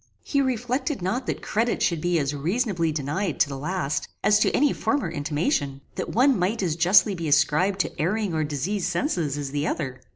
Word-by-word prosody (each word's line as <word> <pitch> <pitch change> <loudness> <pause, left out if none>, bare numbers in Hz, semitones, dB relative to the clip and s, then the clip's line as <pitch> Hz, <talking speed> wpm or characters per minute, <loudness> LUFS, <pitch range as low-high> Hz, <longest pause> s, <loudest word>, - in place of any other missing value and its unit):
He 280 - +1
reflected 255 - -1
not 240 +8 -2
that - - -3
credit 225 +2 0
should 170 -3 +1
be 175 0 +1
as 145 -2 0
reasonably 170 - 0
denied 155 +4 -2
to 145 - +3
the 140 - -5
last, 150 +1 -2 0.2
as 210 0 +4
to - - +3
any 290 0 +2
former 280 - -1
intimation; 145 - -1
that - - -4
one 260 -1 +3
might 195 +4 0
as 165 -4 0
justly 185 +4 +5
be 170 -3 -4
ascribed 150 +6 +3
to - - -4
erring 200 +3 0
or 155 -1 0
diseased 165 +7 -2
senses 170 - -1
as 140 -2 -4
the 145 +1 -1
other. 130 -5 -3
175 Hz, 195 wpm, -25 LUFS, 150-215 Hz, 0.2 s, justly